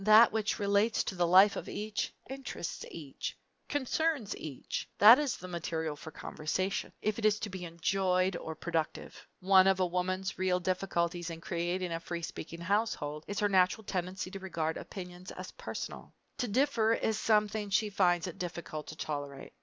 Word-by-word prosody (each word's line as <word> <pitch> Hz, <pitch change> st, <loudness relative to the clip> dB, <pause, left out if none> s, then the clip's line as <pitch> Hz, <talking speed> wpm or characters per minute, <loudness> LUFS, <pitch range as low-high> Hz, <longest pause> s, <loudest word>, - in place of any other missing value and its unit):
That 215 Hz, +2 st, +8 dB
which 220 Hz, -1 st, 0 dB
relates 205 Hz, +2 st, +2 dB
to -, -, -3 dB
the 175 Hz, -1 st, +2 dB
life 190 Hz, +4 st, +7 dB
of -, -, -5 dB
each, 210 Hz, 0 st, -3 dB, 0.2 s
interests 265 Hz, -9 st, -5 dB
each, 145 Hz, -5 st, -6 dB, 0.3 s
concerns 290 Hz, -4 st, 0 dB
each 145 Hz, -5 st, -5 dB
that 225 Hz, +6 st, +10 dB
is 290 Hz, -4 st, 0 dB
the 185 Hz, -, -8 dB
material 160 Hz, -3 st, -3 dB
for 150 Hz, -, -9 dB
conversation, 160 Hz, +5 st, -2 dB
if 215 Hz, +1 st, 0 dB
it -, -, -6 dB
is 215 Hz, 0 st, +4 dB
to 210 Hz, -, -3 dB
be 185 Hz, -1 st, -5 dB
enjoyable 185 Hz, +2 st, +1 dB
or 160 Hz, -, -5 dB
productive. 165 Hz, -1 st, -3 dB
One 190 Hz, 0 st, +6 dB
of 190 Hz, -1 st, +4 dB
a 185 Hz, -, +4 dB
woman's 185 Hz, +2 st, -2 dB
real 185 Hz, -1 st, +2 dB
difficulties 175 Hz, -2 st, -1 dB
in 165 Hz, -1 st, -6 dB
creating 175 Hz, +1 st, -2 dB
a 165 Hz, -, -1 dB
free 170 Hz, 0 st, -5 dB
speaking 165 Hz, +1 st, -6 dB
household 165 Hz, -6 st, -1 dB
is 205 Hz, 0 st, -3 dB
her 205 Hz, -, +3 dB
natural 190 Hz, +3 st, +3 dB
tendency 185 Hz, 0 st, -3 dB
to 195 Hz, -, -6 dB
regard 165 Hz, -4 st, -2 dB
opinions 180 Hz, -1 st, -8 dB
as -, -, -7 dB
personal. -, -, -7 dB, 0.2 s
To 245 Hz, -, 0 dB
differ 230 Hz, -1 st, +3 dB
is 220 Hz, -1 st, 0 dB
something 210 Hz, -1 st, +2 dB
she 210 Hz, +1 st, +2 dB
finds 175 Hz, -3 st, +3 dB
it 180 Hz, -, -7 dB
difficult 170 Hz, -3 st, -5 dB
to 155 Hz, -, -7 dB
tolerate. 145 Hz, -3 st, -5 dB
185 Hz, 175 wpm, -32 LUFS, 170-210 Hz, 0.3 s, that